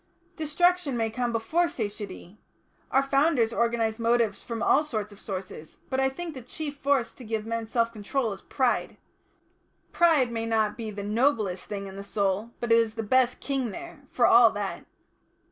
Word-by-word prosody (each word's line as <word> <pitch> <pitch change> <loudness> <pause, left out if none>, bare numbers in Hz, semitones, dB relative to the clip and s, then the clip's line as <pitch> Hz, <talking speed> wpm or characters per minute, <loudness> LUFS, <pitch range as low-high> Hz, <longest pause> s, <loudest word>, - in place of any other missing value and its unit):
"Destruction 320 -2 +1
may 225 -1 0
come 245 +1 -1
before 320 +10 +1
satiety. 205 - -6 0.5
Our 270 - +3
Founders 275 -4 +2
organised 230 -1 0
motives 230 -3 +1
from 230 -1 -4
all 290 - +4
sorts 215 -8 -3
of 200 - -14
sources, 185 -5 -7
but 265 - 0
I 265 0 +3
think 330 +4 -6
the 260 - -8
chief 290 +4 -6
force 280 -4 +1
to 255 - -12
give 220 -1 -3
men 230 0 -3
self 230 0 0
control 225 +2 -2
is 195 - -11
Pride. 255 -3 0 0.9
Pride 315 -8 +4
may 225 -1 -3
not 220 -2 +1
be 225 -2 -5
the 205 -1 -6
noblest 215 -4 0
thing 200 -1 -5
in 195 0 -9
the 200 - -6
soul, 200 +1 -1
but 240 -1 -2
it 230 - +7
is 225 -1 0
the 225 - -3
best 250 +3 +2
King 270 -4 -1
there, 300 - -9
for 245 - +2
all 235 -1 +7
that. 205 -2 -4
230 Hz, 180 wpm, -27 LUFS, 215-270 Hz, 0.9 s, it